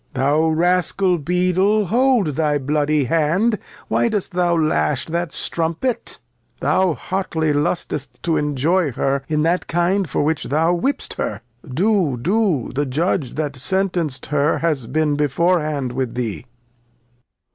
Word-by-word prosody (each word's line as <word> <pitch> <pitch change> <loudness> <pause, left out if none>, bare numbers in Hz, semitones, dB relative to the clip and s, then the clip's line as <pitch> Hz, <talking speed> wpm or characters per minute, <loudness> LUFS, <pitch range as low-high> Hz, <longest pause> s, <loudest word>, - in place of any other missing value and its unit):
Thou 145 +5 +2
Rascal, 180 +2 +2
Beadle, 185 +6 +1
hold 240 -2 +2
up - - -4
thy 150 -1 +1
bloody 145 +1 +1
Hand, 165 - +1 0.3
why 235 - +1
dost 205 -3 -2
thou 175 -1 +1
lash 115 - +1
that 170 -1 -3
Strumpet? 170 +9 -1 0.4
Thou 185 -4 +2
Jiotly 160 0 -1
lust'st 145 -1 -2
to 165 -2 +1
enjoy 150 +2 +1
her 135 +3 0
in 150 -1 +1
that 170 +3 0
Kind 175 +1 +1
for - - 0
which 155 +1 -1
thou 160 +5 +1
whipst 265 +10 -2
her; 105 +1 -3 0.3
do, 180 - +1
do, 185 - 0
the 145 +2 -1
Judge 145 -1 -1
that 150 -2 -2
sentenc'd 170 -1 0
her 150 +1 +2
has 150 -8 -1
been 150 0 0
before 170 +5 +2
hand 145 -5 -3
with 125 -2 -3
thee. 120 -2 -3
160 Hz, 140 wpm, -20 LUFS, 145-180 Hz, 0.4 s, Thou